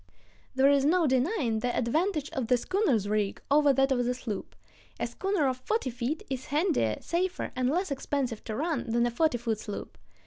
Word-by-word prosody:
There 265 Hz, +1 st, +5 dB
is 280 Hz, -1 st, +4 dB
no 335 Hz, +4 st, +3 dB
denying 260 Hz, -, +1 dB
the 245 Hz, +2 st, -1 dB
advantage 305 Hz, -, 0 dB
of 255 Hz, -4 st, -2 dB
the 250 Hz, -, +4 dB
schooner's 270 Hz, -, +1 dB
rig 205 Hz, -1 st, 0 dB
over 290 Hz, 0 st, +5 dB
that 270 Hz, +1 st, +2 dB
of 245 Hz, -2 st, +2 dB
the 250 Hz, +1 st, 0 dB
sloop. 220 Hz, -5 st, -6 dB, 0.4 s
A -, -, 0 dB
schooner 385 Hz, -7 st, 0 dB
of 255 Hz, -1 st, -1 dB
forty 265 Hz, -, -1 dB
feet 250 Hz, +6 st, -3 dB
is 260 Hz, -1 st, -4 dB
handier, 295 Hz, -, +1 dB
safer, 360 Hz, +2 st, -2 dB
and 255 Hz, 0 st, +1 dB
less 350 Hz, +3 st, 0 dB
expensive 270 Hz, -4 st, -2 dB
to 215 Hz, -, -4 dB
run 305 Hz, -2 st, -2 dB
than 235 Hz, +1 st, +2 dB
a 240 Hz, -, 0 dB
forty 280 Hz, +1 st, +2 dB
foot 225 Hz, -2 st, -2 dB
sloop. 205 Hz, -2 st, -7 dB
265 Hz, 195 wpm, -29 LUFS, 240-310 Hz, 0.4 s, There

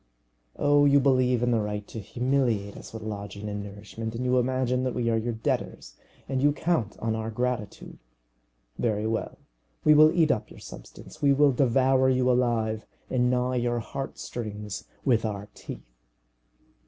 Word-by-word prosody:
Oh, 145 Hz, 0 st, +4 dB
you 140 Hz, 0 st, +6 dB
believe 130 Hz, -3 st, +3 dB
in 120 Hz, -, +2 dB
the 115 Hz, -, +3 dB
right 105 Hz, -1 st, -3 dB
to 110 Hz, -, -6 dB
humiliate 120 Hz, -2 st, 0 dB
us -, -, -10 dB
with 110 Hz, -1 st, -8 dB
lodging 100 Hz, -1 st, -6 dB
and 105 Hz, 0 st, -4 dB
nourishment, 105 Hz, +3 st, -7 dB
and 125 Hz, +2 st, -3 dB
you 125 Hz, 0 st, +3 dB
imagine 125 Hz, 0 st, 0 dB
that 130 Hz, -1 st, -2 dB
we 115 Hz, -2 st, 0 dB
are -, -, +2 dB
your 115 Hz, +1 st, -2 dB
debtors, 110 Hz, -, -3 dB, 0.3 s
and 130 Hz, -1 st, -1 dB
you 145 Hz, +1 st, +4 dB
count 150 Hz, -, -1 dB
on 115 Hz, 0 st, -1 dB
our 110 Hz, 0 st, -3 dB
gratitude! 120 Hz, -2 st, -4 dB, 0.8 s
Very 110 Hz, -2 st, 0 dB
well; 110 Hz, 0 st, -2 dB, 0.5 s
we 150 Hz, -, +6 dB
will 155 Hz, +1 st, +7 dB
eat 165 Hz, -4 st, +3 dB
up 105 Hz, -, -2 dB
your -, -, -13 dB
substance, -, -, -12 dB
we 140 Hz, -1 st, +5 dB
will 145 Hz, 0 st, +5 dB
devour 130 Hz, +1 st, +3 dB
you 130 Hz, -1 st, +3 dB
alive 115 Hz, -3 st, +1 dB, 0.3 s
and 125 Hz, -1 st, +2 dB
gnaw 125 Hz, 0 st, +1 dB
your 120 Hz, -1 st, 0 dB
heart 135 Hz, +4 st, -5 dB
strings 105 Hz, -3 st, -6 dB, 0.2 s
with 120 Hz, -5 st, +3 dB
our 105 Hz, -1 st, -4 dB
teeth. -, -, -10 dB
120 Hz, 170 wpm, -27 LUFS, 110-130 Hz, 0.8 s, will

